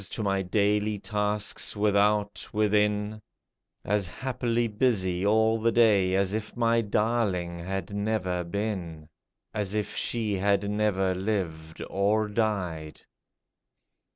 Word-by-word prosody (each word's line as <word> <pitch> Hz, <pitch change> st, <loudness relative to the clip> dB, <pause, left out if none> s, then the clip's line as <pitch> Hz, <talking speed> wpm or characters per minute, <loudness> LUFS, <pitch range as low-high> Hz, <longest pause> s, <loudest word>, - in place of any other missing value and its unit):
To 110 Hz, -, -3 dB
my 100 Hz, -1 st, +1 dB
daily 105 Hz, +2 st, +1 dB
tasks, 105 Hz, +1 st, -2 dB
without, 105 Hz, 0 st, +1 dB
within, 105 Hz, 0 st, +1 dB, 0.6 s
As 100 Hz, -2 st, 0 dB
happily 120 Hz, +2 st, -1 dB
busy 100 Hz, -6 st, 0 dB
all 110 Hz, +2 st, +3 dB
the 115 Hz, +1 st, +3 dB
day 100 Hz, -6 st, +4 dB
As 100 Hz, 0 st, +1 dB
if 110 Hz, +2 st, -4 dB
my 115 Hz, -1 st, +3 dB
darling 100 Hz, -5 st, 0 dB
had 95 Hz, +2 st, -4 dB
never 100 Hz, -4 st, -1 dB
been! 85 Hz, -5 st, -4 dB, 0.2 s
— -, -, -57 dB
As 105 Hz, -2 st, -2 dB
if 105 Hz, -1 st, -2 dB
she 110 Hz, -3 st, -1 dB
had 100 Hz, +1 st, +1 dB
never 100 Hz, -3 st, +1 dB
lived, 90 Hz, -5 st, -3 dB
or 105 Hz, +2 st, +1 dB
died 95 Hz, -8 st, -2 dB
105 Hz, 120 wpm, -27 LUFS, 95-110 Hz, 0.6 s, day